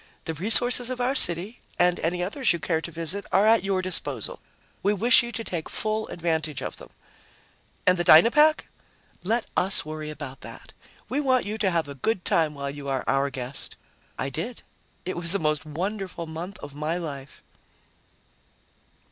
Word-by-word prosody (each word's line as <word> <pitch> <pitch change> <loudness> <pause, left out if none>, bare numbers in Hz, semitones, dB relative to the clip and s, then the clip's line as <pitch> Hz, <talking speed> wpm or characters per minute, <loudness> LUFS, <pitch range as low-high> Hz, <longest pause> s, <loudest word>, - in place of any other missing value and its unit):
The 160 - -3
resources 240 - +4
of 255 -1 -4
our 250 +2 +1
city 185 - +4 0.2
and 175 0 +3
any 175 +2 -1
others 220 +4 +1
you - - -2
care 160 +1 -1
to 170 - -7
visit 170 +5 -1
are 195 +2 +4
at 225 -2 +4
your 195 -1 -1
disposal. 185 - 0 0.4
We 205 +1 +1
wish 230 +5 +5
you 240 0 -5
to 230 - -4
take 170 -7 -5
full 215 0 -2
advantage 160 -5 -2
of - - -6
them." - - -11 1.0
"And 180 -1 +4
the - - +1
Dynapack?" 270 - +6 0.6
"Let 225 +6 0
us 190 -3 +2
worry 155 0 -6
about 145 -3 -8
that. - - -11 0.3
We 270 - -1
want 260 -3 +2
you 215 +2 -4
to 200 - +2
have 165 -4 0
a 140 - -7
good 180 - -2
time 155 -3 +1
while 140 0 -4
you 140 -1 -7
are 135 -1 -1
our 135 +1 +1
guest." 130 0 -6 0.4
I 135 - -2
did. 170 - -5 0.4
It 185 - -3
was 170 +1 -1
the - - +2
most 155 -2 -1
wonderful 185 +2 -4
month 165 +5 -7
of 140 - -8
my 155 +4 -2
life. 140 -5 -8
175 Hz, 180 wpm, -25 LUFS, 155-215 Hz, 1.0 s, Dynapack